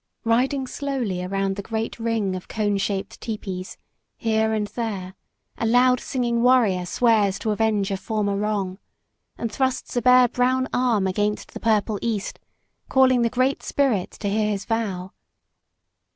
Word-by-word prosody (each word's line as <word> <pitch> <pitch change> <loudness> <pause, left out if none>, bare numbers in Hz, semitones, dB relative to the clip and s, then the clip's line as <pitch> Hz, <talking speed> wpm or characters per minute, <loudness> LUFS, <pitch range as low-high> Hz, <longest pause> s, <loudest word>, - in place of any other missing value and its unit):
Riding 260 +4 +1
slowly 255 -10 -3
around 195 +1 -1
the - - -2
great 225 +3 -4
ring 225 -4 -1
of 185 - -7
cone 205 -2 0
shaped 195 +1 -3
tepees, 190 -4 -5 0.4
here 220 -1 +1
and 215 -1 0
there, 205 -5 -4 0.5
a 225 - 0
loud 250 +2 +4
singing 240 -2 -1
warrior 225 -8 +3
swears 210 -3 +2
to 215 +2 -2
avenge 210 -2 +1
a 195 - -1
former 205 -1 -1
wrong, 200 -2 -2 0.6
and 230 - -3
thrusts 260 +2 -1
a 245 - +2
bare 250 +1 +6
brown 255 +2 +1
arm 240 -6 +2
against 205 +2 -1
the - - -6
purple 215 -2 +1
east, 220 -4 -3 0.5
calling 260 -2 +4
the 230 - +2
Great 255 +3 +1
Spirit 255 -10 0
to 205 - -5
hear 210 +1 +1
his 200 -1 -2
vow. 195 -5 -2
220 Hz, 150 wpm, -23 LUFS, 200-245 Hz, 0.6 s, bare